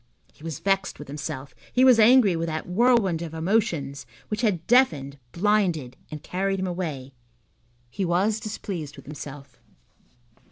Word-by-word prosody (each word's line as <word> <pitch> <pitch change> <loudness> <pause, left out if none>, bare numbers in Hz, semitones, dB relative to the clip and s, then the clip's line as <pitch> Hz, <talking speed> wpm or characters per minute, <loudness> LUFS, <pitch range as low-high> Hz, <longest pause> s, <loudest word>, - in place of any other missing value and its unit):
He - - -19
was 165 -4 -4
vexed 195 0 0
with 145 - -10
himself, 145 -1 -6 0.2
he 255 +1 +4
was 250 -3 +7
angry 220 -4 +6
with 165 0 -2
that 160 -1 -3
whirlwind 200 -3 +3
of 165 -1 -6
emotions 160 - -1 0.2
which 210 +1 -2
had 195 -8 0
deafened, 150 - +2
blinded, 175 -9 +1
and 150 -1 -8
carried 195 +1 -1
him 190 - -1
away. 155 -8 -4 0.8
He 195 - -3
was 190 +5 +1
displeased 180 -9 -6
with - - -13
himself. 140 -2 -9
175 Hz, 150 wpm, -25 LUFS, 150-210 Hz, 0.8 s, was